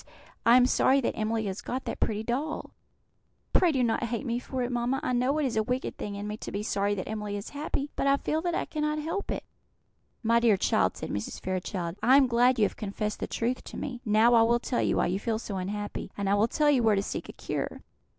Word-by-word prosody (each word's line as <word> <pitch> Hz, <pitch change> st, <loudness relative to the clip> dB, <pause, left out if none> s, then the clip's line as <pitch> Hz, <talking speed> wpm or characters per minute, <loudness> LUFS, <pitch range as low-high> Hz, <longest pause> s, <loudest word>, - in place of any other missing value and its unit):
I 235 Hz, +2 st, +8 dB
am 250 Hz, -, +6 dB
sorry 265 Hz, +1 st, +4 dB
that -, -, -1 dB
Emily 220 Hz, 0 st, -1 dB
has 195 Hz, 0 st, -4 dB
got 255 Hz, +1 st, -4 dB
that -, -, -4 dB
pretty 215 Hz, 0 st, 0 dB
doll. 275 Hz, +7 st, -3 dB, 0.8 s
Pray 355 Hz, -, +5 dB
do 265 Hz, -4 st, +1 dB
not 235 Hz, 0 st, +1 dB
hate 235 Hz, +4 st, -3 dB
me 240 Hz, -1 st, -1 dB
for 255 Hz, 0 st, -3 dB
it, 245 Hz, -, -2 dB
mamma; 245 Hz, +2 st, 0 dB
I 255 Hz, -, 0 dB
know 255 Hz, +4 st, +2 dB
it 305 Hz, -, +1 dB
is 225 Hz, -4 st, +1 dB
wicked 250 Hz, +4 st, -3 dB
in 205 Hz, 0 st, -4 dB
me 210 Hz, 0 st, -4 dB
to -, -, -7 dB
be 205 Hz, +1 st, -3 dB
sorry 205 Hz, 0 st, 0 dB
that 185 Hz, -, -4 dB
Emily 210 Hz, -1 st, -3 dB
is 200 Hz, -, -7 dB
happy, 290 Hz, -1 st, -3 dB
but -, -, 0 dB
I 275 Hz, 0 st, +5 dB
feel 310 Hz, +2 st, -1 dB
that 345 Hz, 0 st, -1 dB
I -, -, -1 dB
cannot 300 Hz, -1 st, -1 dB
help 330 Hz, +7 st, -3 dB
it." -, -, -2 dB, 0.8 s
"My 230 Hz, +1 st, +4 dB
dear 230 Hz, -4 st, +4 dB
child," -, -, +1 dB
said -, -, -5 dB
Mrs. 105 Hz, +1 st, -4 dB
Fairchild, 185 Hz, -1 st, -3 dB
"I 260 Hz, +3 st, +6 dB
am 280 Hz, -, +6 dB
glad 245 Hz, +1 st, +3 dB
you 215 Hz, -, +4 dB
have -, -, -3 dB
confessed 210 Hz, +1 st, -3 dB
the -, -, -3 dB
truth 245 Hz, +2 st, -2 dB
to -, -, -8 dB
me. 255 Hz, -4 st, -5 dB
Now 220 Hz, +1 st, +4 dB
I 230 Hz, -, +7 dB
will 235 Hz, +1 st, +4 dB
tell 245 Hz, 0 st, -1 dB
you -, -, +1 dB
why -, -, +3 dB
you 185 Hz, +2 st, 0 dB
feel 225 Hz, +1 st, -1 dB
so 210 Hz, -3 st, -5 dB
unhappy, 205 Hz, +3 st, -4 dB
and 200 Hz, -1 st, -2 dB
I 195 Hz, -, +3 dB
will 205 Hz, +2 st, +3 dB
tell 295 Hz, +4 st, +3 dB
you 265 Hz, -4 st, +3 dB
where 220 Hz, -2 st, +4 dB
to 195 Hz, -, 0 dB
seek -, -, -5 dB
a -, -, -7 dB
cure. -, -, -4 dB
235 Hz, 250 wpm, -28 LUFS, 210-260 Hz, 0.8 s, I